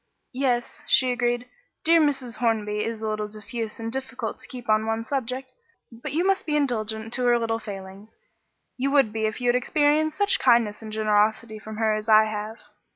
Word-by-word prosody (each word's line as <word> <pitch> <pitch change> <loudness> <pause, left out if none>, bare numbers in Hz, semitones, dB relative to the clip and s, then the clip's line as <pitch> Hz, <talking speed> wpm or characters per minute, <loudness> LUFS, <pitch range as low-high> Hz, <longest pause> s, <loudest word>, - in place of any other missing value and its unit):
"Yes," 250 -2 -1
she 255 -1 +4
agreed. 240 0 -1 0.4
"Dear 330 0 +5
Mrs. 265 -6 0
Hornby 210 -3 0
is 225 -1 -4
a - - -1
little 215 0 -2
diffuse 215 +2 -6
and 225 0 -4
difficult 255 -3 -4
to - - -9
keep 250 -2 -9
to 215 0 +3
one 225 +1 -2
subject; 260 0 -3 0.4
but 240 +5 -7
you 330 +6 0
must 390 -2 +1
be 300 - 0
indulgent 225 -5 -1
to 250 - 0
her 240 0 +5
little 225 -1 -1
failings; 195 0 -9 0.6
you 265 +2 0
would 275 -7 +3
be 220 -1 0
if 215 - -4
you 245 -1 +1
had 240 - +3
experienced 300 +4 +2
such 405 0 +3
kindness 235 -4 +3
and 220 -1 -8
generosity 215 +1 +1
from 215 0 -9
her 220 -1 +2
as 215 +1 -3
I 215 0 +7
have." 215 +1 -5
230 Hz, 195 wpm, -25 LUFS, 215-255 Hz, 0.6 s, I